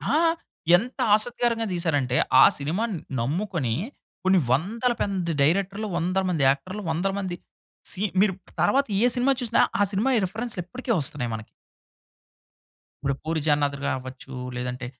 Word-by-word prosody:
ఆ! -, -, +5 dB, 0.6 s
ఎంత 245 Hz, +8 st, -6 dB, 0.2 s
ఆసక్తికరంగా 230 Hz, +1 st, 0 dB
తీశారంటే, 145 Hz, -8 st, 0 dB, 0.2 s
ఆ -, -, +10 dB
సినిమాని 185 Hz, +9 st, -2 dB, 0.2 s
నమ్ముకొని 155 Hz, -, -1 dB, 0.5 s
కొన్ని 190 Hz, 0 st, +4 dB
వందల 220 Hz, -, +1 dB
పెంది 185 Hz, -4 st, -1 dB
డైరెక్టర్లు, 195 Hz, +8 st, +1 dB
వందల 185 Hz, +3 st, 0 dB
మంది 165 Hz, -6 st, 0 dB
యాక్టర్లు 185 Hz, +10 st, -2 dB
వందల 175 Hz, +5 st, 0 dB
మంది 185 Hz, -3 st, -3 dB, 0.6 s
సి 190 Hz, -, -3 dB, 0.2 s
మీరు 200 Hz, -2 st, +3 dB, 0.3 s
తర్వాత 275 Hz, +1 st, +3 dB, 0.2 s
ఏ -, -, +5 dB
సినిమా 250 Hz, +2 st, +2 dB
చూసినా 235 Hz, -2 st, +2 dB, 0.2 s
ఆ -, -, +5 dB
సినిమాయి 235 Hz, +6 st, +2 dB
రిఫరెన్స్‌లు 215 Hz, +1 st, -3 dB
ఇప్పటికే 255 Hz, +6 st, -5 dB
వస్తున్నాయి 135 Hz, -3 st, -1 dB
మనకి, 110 Hz, -1 st, -6 dB, 1.6 s
ఇప్పుడు 140 Hz, 0 st, 0 dB
'పూరి 160 Hz, 0 st, -1 dB
జగన్నాథుడు' 145 Hz, -1 st, +1 dB
గారావ్వచ్చు, 130 Hz, 0 st, -5 dB, 0.2 s
లేదంటే 125 Hz, 0 st, -4 dB
180 Hz, 130 wpm, -25 LUFS, 140-215 Hz, 1.6 s, ఆ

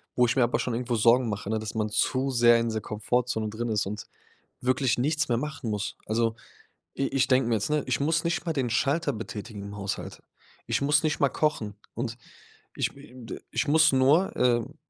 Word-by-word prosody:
wo 125 Hz, -, +4 dB
ich 115 Hz, -, 0 dB
mir 130 Hz, -, +4 dB
aber 120 Hz, -, +1 dB
schon 125 Hz, -, -2 dB
irgendwo 120 Hz, 0 st, -1 dB
Sorgen 115 Hz, +2 st, +4 dB
mache, 105 Hz, -1 st, -4 dB
ne, 110 Hz, -, 0 dB
dass 110 Hz, 0 st, -5 dB
man 110 Hz, -1 st, 0 dB
zu 130 Hz, +5 st, +1 dB
sehr 120 Hz, -1 st, +5 dB
in 115 Hz, 0 st, 0 dB
dieser 110 Hz, -1 st, -2 dB
Komfortzone 110 Hz, +1 st, -1 dB
drin 115 Hz, +2 st, -4 dB
ist 105 Hz, -2 st, +1 dB
und 105 Hz, +1 st, -5 dB, 0.6 s
wirklich 130 Hz, -1 st, +1 dB
nichts 155 Hz, +5 st, +1 dB
mehr 120 Hz, -2 st, +1 dB
machen 145 Hz, -4 st, -4 dB
muss. 105 Hz, -1 st, -3 dB
Also 115 Hz, +1 st, 0 dB, 0.6 s
i 135 Hz, -, +1 dB
ich 135 Hz, -1 st, +1 dB
denke 130 Hz, -2 st, +3 dB
mir 120 Hz, -, +2 dB
jetzt, 105 Hz, -, -2 dB
ne, 150 Hz, -1 st, +2 dB
„ich 125 Hz, -3 st, 0 dB
muss 160 Hz, +3 st, +1 dB
nicht 170 Hz, 0 st, -1 dB
mal 165 Hz, -, +1 dB
den 130 Hz, -5 st, -1 dB
Schalter 145 Hz, +5 st, +1 dB
betätigen 105 Hz, -1 st, -7 dB
im 100 Hz, 0 st, -8 dB
Haushalt. 100 Hz, -1 st, -5 dB, 0.4 s
Ich -, -, 0 dB
muss 145 Hz, +1 st, +3 dB
nicht 155 Hz, -, 0 dB
mal 140 Hz, -, +5 dB
kochen. 115 Hz, -9 st, -1 dB, 0.2 s
Und 115 Hz, 0 st, -3 dB, 0.6 s
ich, -, -, -1 dB
me 140 Hz, +1 st, -13 dB
m 125 Hz, -1 st, -12 dB
d -, -, -7 dB
ich 155 Hz, -, 0 dB
muss 160 Hz, +1 st, +5 dB
nur, 140 Hz, +8 st, +3 dB
ähm, 120 Hz, -2 st, +1 dB
120 Hz, 220 wpm, -27 LUFS, 110-140 Hz, 0.6 s, sehr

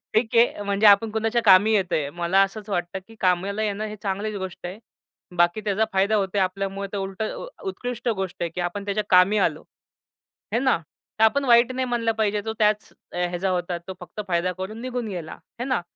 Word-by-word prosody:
ठीक 225 Hz, +2 st, +1 dB
आहे. 230 Hz, -3 st, +3 dB
म्हणजे 200 Hz, +1 st, +2 dB
आपण 205 Hz, +2 st, +6 dB
कुणाच्या 225 Hz, +2 st, 0 dB
कामी 200 Hz, +2 st, +6 dB
येतोय. 180 Hz, -7 st, +1 dB
मला 175 Hz, +4 st, +2 dB
असंच 205 Hz, +2 st, -3 dB
वाटतं 175 Hz, 0 st, -2 dB
की 225 Hz, -, -14 dB
कामाला 190 Hz, +3 st, +1 dB
येणं 210 Hz, 0 st, -2 dB
हे 215 Hz, 0 st, -7 dB
चांगलीच 205 Hz, +1 st, -2 dB
गोष्ट 190 Hz, -2 st, -6 dB
आहे. 185 Hz, +4 st, -7 dB, 0.6 s
बाकी 175 Hz, +4 st, +3 dB
त्याचा 210 Hz, +1 st, +1 dB
फायदा 195 Hz, +3 st, +2 dB
होतोय 195 Hz, 0 st, 0 dB
आपल्यामुळे 195 Hz, +1 st, -2 dB
ते -, -, -3 dB
उलट 195 Hz, +1 st, -4 dB, 0.4 s
उत्कृष्ट 245 Hz, -, -4 dB
गोष्ट 190 Hz, -2 st, -4 dB
आहे 170 Hz, -, -1 dB
की 180 Hz, -, -3 dB
आपण 175 Hz, +3 st, -3 dB
त्याच्या 205 Hz, +1 st, -1 dB
कामी 185 Hz, +3 st, +5 dB
आलो. -, -, +1 dB, 0.9 s
आहे 230 Hz, -, +2 dB
ना 260 Hz, -2 st, +3 dB, 0.4 s
तर -, -, +5 dB
आपण 275 Hz, +5 st, +3 dB
वाईट 240 Hz, 0 st, +5 dB
नाही 260 Hz, 0 st, -1 dB
म्हणलं 240 Hz, -2 st, 0 dB
पाहिजे 210 Hz, -2 st, 0 dB
तो 220 Hz, -, -2 dB
त्याच 210 Hz, 0 st, +2 dB, 0.2 s
ह्याचा 180 Hz, +1 st, -1 dB
होता 175 Hz, -1 st, -1 dB
तो 190 Hz, -, -5 dB
फक्त 180 Hz, +3 st, -10 dB
फायदा 175 Hz, 0 st, +1 dB
करून 215 Hz, +5 st, -6 dB
निघून 250 Hz, -2 st, -3 dB
गेला 175 Hz, -5 st, -6 dB
आहे 235 Hz, -, -10 dB
ना. 260 Hz, -8 st, 0 dB
200 Hz, 195 wpm, -24 LUFS, 185-220 Hz, 0.9 s, आपण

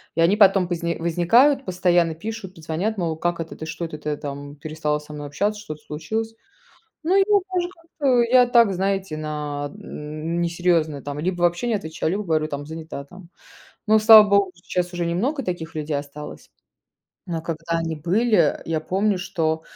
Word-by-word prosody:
и 165 Hz, -, +2 dB
они 185 Hz, +5 st, +4 dB
потом 195 Hz, -3 st, +5 dB
позни 170 Hz, -1 st, -1 dB
возникают, 230 Hz, -, +3 dB
постоянно 175 Hz, -3 st, +2 dB
пишут, 200 Hz, +1 st, -7 dB
позвонят, 165 Hz, +7 st, -3 dB
мол: 165 Hz, -4 st, -2 dB
"Как 175 Hz, 0 st, -1 dB
это, 165 Hz, -, -8 dB
ты 160 Hz, -, -6 dB
что, 165 Hz, +2 st, -6 dB
это 160 Hz, -2 st, -7 dB
ты 150 Hz, 0 st, -3 dB
там 145 Hz, 0 st, -7 dB
перестала 150 Hz, 0 st, -2 dB
со 150 Hz, 0 st, -13 dB
мной 145 Hz, -1 st, -6 dB
общаться, 205 Hz, +9 st, -1 dB
что-то 155 Hz, -8 st, -8 dB
случилось?" 220 Hz, +10 st, -4 dB, 0.7 s
Ну 350 Hz, +4 st, +2 dB
и -, -, +6 dB
я 410 Hz, +2 st, +4 dB, 0.2 s
даже 350 Hz, -1 st, +1 dB
как-то, 300 Hz, -8 st, 0 dB
я 250 Hz, +1 st, +5 dB
так, 235 Hz, -5 st, +5 dB
знаете, 195 Hz, -2 st, -1 dB
на 150 Hz, -2 st, -4 dB
несерьезно 165 Hz, 0 st, -1 dB
там 145 Hz, 0 st, -5 dB
либо 175 Hz, +2 st, -2 dB
вообще 175 Hz, +7 st, +1 dB
не 230 Hz, -, +1 dB
отвечаю, 160 Hz, -5 st, -3 dB
либо 205 Hz, +2 st, -2 dB
говорю 155 Hz, -3 st, 0 dB
там: 145 Hz, -1 st, -5 dB
"Занята 160 Hz, -2 st, -7 dB
там". 180 Hz, +2 st, -14 dB, 0.6 s
Но, 220 Hz, 0 st, +6 dB
слава 215 Hz, -1 st, +9 dB
богу, 200 Hz, -2 st, +3 dB
сейчас 180 Hz, +1 st, -3 dB
уже 175 Hz, -1 st, -2 dB
немного 240 Hz, -, -1 dB
таких 170 Hz, -4 st, -5 dB
людей 150 Hz, -1 st, -2 dB
осталось. 145 Hz, +1 st, -9 dB, 0.8 s
Но 165 Hz, -2 st, -3 dB
когда 165 Hz, 0 st, -2 dB
они 165 Hz, -1 st, -2 dB
были, 205 Hz, +9 st, +2 dB
я 160 Hz, -1 st, -1 dB
помню, 195 Hz, +4 st, 0 dB
что 160 Hz, -3 st, -1 dB
170 Hz, 175 wpm, -23 LUFS, 155-205 Hz, 0.8 s, слава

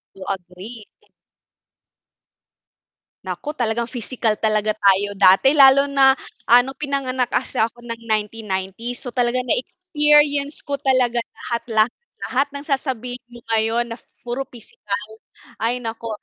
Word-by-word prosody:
To 195 Hz, -, -10 dB
agree. 195 Hz, +4 st, -8 dB, 2.4 s
Nako, 295 Hz, -, -5 dB
talagang 235 Hz, 0 st, 0 dB
physical 230 Hz, -3 st, -2 dB
talaga 215 Hz, -1 st, +1 dB
tayo 200 Hz, 0 st, +2 dB
dati. 195 Hz, +11 st, +5 dB
Lalo 275 Hz, 0 st, +7 dB
na, 270 Hz, -1 st, +5 dB, 0.3 s
ah, 240 Hz, +1 st, +7 dB
no'ng 265 Hz, +1 st, -8 dB
pinanganak 260 Hz, -4 st, -2 dB
kasi -, -, -1 dB
ako 230 Hz, +2 st, 0 dB
ng 230 Hz, -1 st, -7 dB
1990s. 215 Hz, +1 st, -3 dB
So, 260 Hz, -, -3 dB
talaga 245 Hz, 0 st, 0 dB
na 250 Hz, -2 st, 0 dB
experience 295 Hz, -3 st, +2 dB
ko 285 Hz, 0 st, -3 dB
talaga 255 Hz, -3 st, +1 dB
lahat, 235 Hz, 0 st, -4 dB
lahat, 220 Hz, +1 st, +3 dB, 0.4 s
lahat 275 Hz, +3 st, +1 dB
ng 280 Hz, +1 st, -7 dB
sasabihin 250 Hz, -4 st, -3 dB
mo 240 Hz, -, -12 dB
ngayon 225 Hz, +2 st, +1 dB
na -, -, -9 dB, 0.2 s
puro 245 Hz, +3 st, -4 dB
pisikal. 210 Hz, -4 st, -6 dB, 0.6 s
Ay, 235 Hz, +2 st, +1 dB
naku. 225 Hz, 0 st, -5 dB
240 Hz, 130 wpm, -21 LUFS, 220-270 Hz, 2.4 s, Lalo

